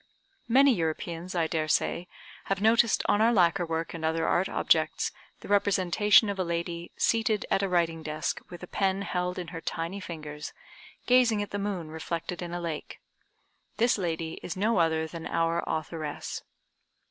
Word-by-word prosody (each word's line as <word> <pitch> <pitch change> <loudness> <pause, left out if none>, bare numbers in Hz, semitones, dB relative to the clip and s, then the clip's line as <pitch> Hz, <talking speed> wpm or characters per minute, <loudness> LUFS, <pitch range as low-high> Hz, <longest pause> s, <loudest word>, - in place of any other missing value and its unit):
Many 270 +3 +6
Europeans, 170 0 -3
I 170 -2 +2
daresay, 160 +2 0 0.4
have 195 0 -1
noticed 225 +1 +4
on 205 - +3
our 230 +2 +5
lacquer 175 -4 +3
work 165 0 -2
and 165 -2 -6
other 160 +1 +1
art 185 +2 +2
objects, - - +2 0.3
the - - -10
representation 205 +1 +4
of 200 -1 -3
a - - +2
lady 170 0 -3
seated 225 -2 +1
at 195 - +3
a 195 - 0
writing 165 -2 +1
desk, 155 0 -3
with 175 0 -10
a - - -6
pen 195 +1 0
held 180 -1 -2
in 180 -2 -5
her 165 -2 -7
tiny 165 +5 -3
fingers, 150 -4 -7 0.5
gazing 245 -4 +4
at 205 - -9
the 205 - -2
moon 195 -6 -3
reflected 165 +2 -4
in 175 -1 -5
a 175 - -3
lake. 165 -3 -5 0.8
This 235 +2 +3
lady 165 -2 -3
is 180 - -5
no 210 0 +2
other 160 -1 +2
than 160 +1 -7
our 165 +1 0
authoress. 155 -1 -4
175 Hz, 170 wpm, -28 LUFS, 165-200 Hz, 0.8 s, Many